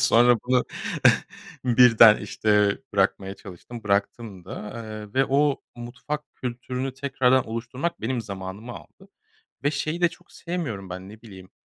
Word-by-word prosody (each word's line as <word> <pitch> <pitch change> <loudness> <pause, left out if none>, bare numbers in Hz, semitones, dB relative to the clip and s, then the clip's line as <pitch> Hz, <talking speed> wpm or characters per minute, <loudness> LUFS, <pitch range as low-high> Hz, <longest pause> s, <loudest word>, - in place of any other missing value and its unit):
Sonra 120 +1 +5
bunu 125 0 +2 1.0
birden, 115 -3 +7
işte, 105 -1 +1 0.2
bırakmaya 95 0 +1
çalıştım, 105 +5 -10
bıraktım 100 -1 -1
da, 105 +5 -7
eee, 110 -1 -8
ve 135 +1 +3
o 140 +1 +2
mutfak 140 +5 -6
kültürünü 125 +1 -4
tekrardan 130 -1 +2
oluşturmak 125 +8 -4
benim 120 +1 -1
zamanımı 100 +3 -7
aldı - - -14 0.6
ve 145 - +3
şeyi 155 +3 -3
de 175 - +5
çok 175 +1 -18
sevmiyorum 135 - -5
ben, 95 +1 -7
ne 110 +2 -13
bileyim, 95 -5 -13
120 Hz, 135 wpm, -25 LUFS, 105-130 Hz, 1.0 s, birden